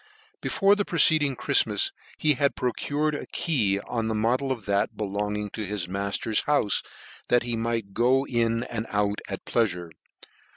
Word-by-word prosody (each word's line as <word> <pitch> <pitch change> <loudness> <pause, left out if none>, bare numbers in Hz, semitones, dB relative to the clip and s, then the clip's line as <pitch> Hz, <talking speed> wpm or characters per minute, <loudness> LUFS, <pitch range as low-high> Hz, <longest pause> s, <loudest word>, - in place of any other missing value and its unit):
Before 200 0 +3
the 205 - 0
preceding 155 -6 +4
Chriftmas 105 -4 +2 0.3
he 155 -1 +3
had 140 +1 +1
pro 125 - 0
cured 150 +4 -1
a 145 - -5
key 110 - +1
on 115 0 -3
the 110 - -1
model 125 +5 +1
of 115 -6 -4
that 100 0 0
belonging 105 0 -3
to 110 - -5
his 100 -3 -3
matter's 100 +3 -1
houfe, 145 -8 +2 0.4
that 120 -1 +3
he 120 -1 -2
might 115 -3 -2
go 125 +5 +3
in 115 -2 0
and 115 -3 -5
out 105 0 0
at - - -5
his - - -10
pleafure. 90 -7 0
115 Hz, 170 wpm, -26 LUFS, 105-135 Hz, 0.4 s, preceding